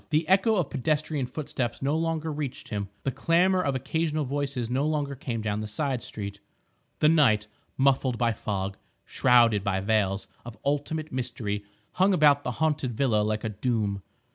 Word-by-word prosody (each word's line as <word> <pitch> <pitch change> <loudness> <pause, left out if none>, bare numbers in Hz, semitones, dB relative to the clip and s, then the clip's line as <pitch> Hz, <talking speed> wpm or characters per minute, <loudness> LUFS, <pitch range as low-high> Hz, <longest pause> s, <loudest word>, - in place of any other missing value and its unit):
The 155 0 +1
echo 195 +4 +4
of 175 -8 0
pedestrian 150 -1 -1
footsteps 125 -3 -3
no 140 +3 +1
longer 160 -1 -1
reached 145 -3 -5
him, 100 -3 -3
the 135 - 0
clamour 180 +7 +3
of 140 -6 0
occasional 155 +3 -1
voices 135 -3 -2
no 130 +4 0
longer 150 -2 -1
came 120 -4 -4
down 105 -1 -1
the 105 - -4
side 130 +3 -2
street. 100 -1 -7 0.6
The 150 - +6
night, 125 -10 +4 0.3
muffled 135 -2 +2
by 115 -1 +2
fog, 100 -2 -3 0.3
shrouded 120 -5 +4
by 95 -1 0
veils 100 -1 0 0.2
of 120 -1 -9
ultimate 145 +2 -1
mystery, 115 -5 -3 0.3
hung 190 +1 +3
about 145 -3 +5
the 125 - -2
haunted 150 -6 0
villa 120 -6 +2
like 110 +1 -1
a 110 - -1
doom. 105 -2 -1
130 Hz, 165 wpm, -27 LUFS, 110-150 Hz, 0.6 s, The